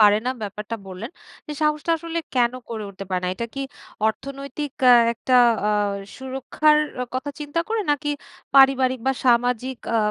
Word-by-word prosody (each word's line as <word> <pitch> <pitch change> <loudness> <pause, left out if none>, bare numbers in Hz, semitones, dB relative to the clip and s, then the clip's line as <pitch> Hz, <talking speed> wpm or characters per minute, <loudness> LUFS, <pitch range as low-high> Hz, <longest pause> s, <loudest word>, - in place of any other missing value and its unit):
পারে 210 -1 +7
না - - +2
ব্যাপারটা 210 +2 -5
বললেন। 190 +5 -7 0.4
এ - - -2
সাহসটা 300 +2 +1
আসলে 335 +1 -4 0.2
কেন 240 -1 +3 0.2
করে 220 -2 -5
উঠতে 195 0 -8
পারে 185 -1 -1
না? - - 0
এটা 230 +5 -4
কি 275 - -4 0.5
অর্থনৈতিক 275 +4 -4 0.2
আ - - +10 0.2
একটা 255 +2 -1 0.3
আ - - +3 0.5
সুরক্ষার 270 +4 +1 0.4
কথা 260 +3 -2
চিন্তা 295 +3 -2
করে? 450 0 0
নাকি 295 +1 0 0.5
পারিবারিক 265 -2 +5
বা 265 - +4
সামাজিক 245 +1 +2 0.2
আ - - +4
260 Hz, 160 wpm, -23 LUFS, 230-290 Hz, 0.5 s, আ